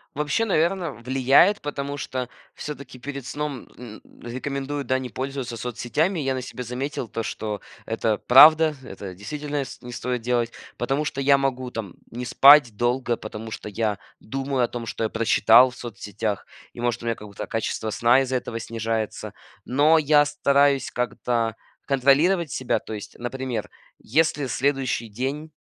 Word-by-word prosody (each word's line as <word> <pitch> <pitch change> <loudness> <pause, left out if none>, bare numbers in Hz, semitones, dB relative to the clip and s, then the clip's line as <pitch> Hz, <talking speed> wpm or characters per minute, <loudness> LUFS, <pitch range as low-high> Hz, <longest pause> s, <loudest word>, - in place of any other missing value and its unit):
Вообще, 150 +10 0
наверно, 175 -3 +1
влияет, 135 - +3
потому 145 -1 -4
что 130 -2 -4 0.3
всё-таки 140 -3 -8
перед 140 0 -6
сном, 145 -3 -4
н 115 -3 -10 0.2
рекомендуют, 140 +3 -4
да, 130 - +2
не 125 -1 -6
пользоваться 130 +1 -4
соцсетями. 125 - -1
Я 135 -2 0
на 130 - -3
себе 125 0 -7
заметил 125 +1 -4
то, 115 - -4
что 105 -3 -4 0.2
это 110 -1 0
правда, 155 +4 +7
это 95 -5 -8
действительно 145 +8 -4
ст 130 - -11
не 125 - -8
стоит 125 0 -3
делать, 120 -1 0 0.3
потому 135 +5 -1
что 135 -1 -3
я 140 0 +5
могу 130 -2 -1
там 105 -6 -6 0.2
не 125 +2 -5
спать 135 -3 +7
долго, 120 +1 0
потому 110 +1 -8
что 105 - -6
я 105 -1 -1 0.2
думаю 135 +2 -2
о 120 - +2
том, 120 -1 -6
что 115 - -3
я 110 - 0
прочитал 115 +2 +5
в 125 - -13
соцсетях, 105 -3 -5 0.3
и, 120 - -8
может, 120 -1 -1
у - - -7
меня 115 - 0
какое-то 105 -3 -8
качество 110 0 -2
сна 120 +5 +4
из-за 130 -1 -2
этого 115 -2 -5
снижается, 115 -1 -3 0.3
но 150 +5 +4
я 150 0 +4
стараюсь 140 -2 +2
как-то 120 -2 -1 0.3
контролировать 145 +5 +3
себя. 130 - 0
То 110 - -9
есть, 105 0 -8
например, 125 -2 -4 0.3
если 150 +1 +1
следующий 130 -2 0
день- 135 +8 -4
130 Hz, 160 wpm, -24 LUFS, 115-140 Hz, 0.3 s, правда